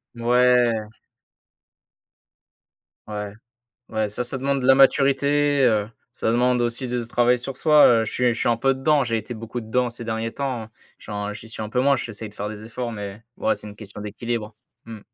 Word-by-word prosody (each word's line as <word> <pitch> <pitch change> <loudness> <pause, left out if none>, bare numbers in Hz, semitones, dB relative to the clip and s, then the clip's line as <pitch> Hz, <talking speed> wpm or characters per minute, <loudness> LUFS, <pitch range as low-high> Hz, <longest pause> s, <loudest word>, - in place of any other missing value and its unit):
Ouais! 120 -2 +3 2.2
Ouais, 105 -1 -5 0.6
ouais, 110 -1 -1
ça 115 +4 0
ça 130 +2 -2
demande 140 +1 0
de - - 0
la 135 - +7
maturité, 140 +1 +3
heu, 105 -1 +1 0.2
ça 115 - -1
demande 125 0 +2
aussi 120 +2 -2
de 120 -1 -2
c 115 - -8
travailler 120 +1 +3
sur 130 +2 -6
soi, 150 -1 +6
heu, 115 -2 +4
je - - -4
suis 125 -1 +1
je 115 - -5
suis - - 0
un 120 - +3
peu 135 +3 +2
dedans, 140 +1 +2
j'ai 115 -1 0
été 120 +3 -7
beaucoup 115 +2 -6
dedans 120 +2 0
ces 120 0 -8
derniers 115 0 -3
temps, 130 -5 -3
hein. 110 - -12 0.3
J'en 105 0 -5
j'y 110 - -10
suis 110 - -9
un 105 - -4
peu 125 +3 0
moins, 140 0 +4
j'essaie 110 -3 -6
de - - -20
faire 105 0 -4
des 110 0 -8
efforts 120 +1 -5
mais 105 0 -7
ouais, - - +1
c'est - - -8
une 105 - -12
question 105 -1 -10
d'équilibre, 110 +1 -4 0.3
mmh. 110 -2 -9
120 Hz, 205 wpm, -23 LUFS, 110-125 Hz, 2.2 s, la